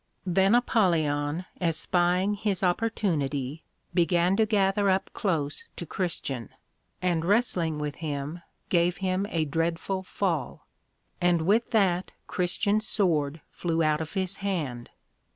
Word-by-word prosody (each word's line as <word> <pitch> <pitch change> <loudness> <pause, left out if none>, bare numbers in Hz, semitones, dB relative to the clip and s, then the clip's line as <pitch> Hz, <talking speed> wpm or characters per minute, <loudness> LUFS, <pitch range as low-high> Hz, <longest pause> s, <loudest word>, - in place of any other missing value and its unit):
Then 190 +4 +4
Apollyon 165 -9 +1 0.2
espying 175 +3 +2
his 200 -2 -1
opportunity, 160 - 0 0.3
began 175 +1 +3
to 220 - +3
gather 200 -1 +2
up 190 0 +1
close 160 -9 -2
to 170 - -6
Christian, 145 -9 -3 0.5
and 175 -3 +1
wrestling 180 -5 +2
with 150 -1 -4
him, 150 +1 -4 0.3
gave 175 0 +2
him 190 +1 -1
a 160 -2 0
dreadful 165 +5 -1
fall; 175 -7 -2 0.6
and 175 -2 +3
with 215 +7 +2
that 190 -5 +2 0.2
Christian's 205 +4 0
Sword 155 -6 +1
flew 165 -1 0
out 155 0 +2
of 160 - -6
his 190 0 0
hand. 150 -12 -3
175 Hz, 120 wpm, -27 LUFS, 155-195 Hz, 0.6 s, Then